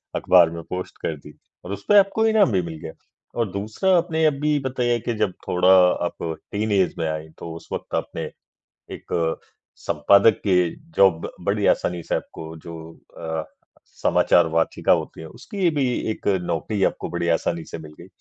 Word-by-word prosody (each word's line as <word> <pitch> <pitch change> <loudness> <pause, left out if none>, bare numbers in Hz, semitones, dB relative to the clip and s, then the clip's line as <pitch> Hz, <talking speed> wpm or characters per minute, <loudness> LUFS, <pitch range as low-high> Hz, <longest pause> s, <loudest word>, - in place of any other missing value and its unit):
अख़बार 90 -3 +5
में 85 0 -7
पोस्ट 90 0 -5
कर 80 - -2
दी 75 0 -13
थी - - -31 0.3
और 90 - -6
उसपे 100 - +2
आपको 200 +3 +2
इनाम 220 - +4
भी 95 -3 +2
मिल 85 -2 -7
गया। - - -7 0.5
और 115 -5 0
दूसरा 105 - -2
आपने 165 -2 +1
अभी 150 0 +2
बताया 125 -3 0
कि 120 - -3
जब 105 -4 0
थोड़ा 90 +1 +2 0.4
आप - - -5 0.3
टीनेज 100 -2 +1
में 80 - 0
आईं 80 0 -5
तो 85 - -7
उस 85 - -11
वक़्त - - -4
आपने - - -3 0.7
एक - - -10 0.6
संपादक 100 +8 +4
के 95 - +4 0.4
जॉब 95 -4 +3 0.2
बड़ी - - +1
आसानी 90 -1 +1
से - - -1
आपको 80 0 -7
जो 85 0 -9 0.4
अ, 80 -1 -3 0.4
समाचार 85 -1 +3
वाचिका 80 0 +1
होती - - 0
है 80 - -8
उसकी 190 - -2
भी 145 -3 0 0.3
एक - - -6 0.2
नौकरी 90 +4 -2
आपको - - -1
बड़ी 85 - -2
आसानी 85 0 0
से - - -7
मिल 80 -1 -11
गई। 85 - -11
95 Hz, 175 wpm, -23 LUFS, 85-120 Hz, 0.7 s, अख़बार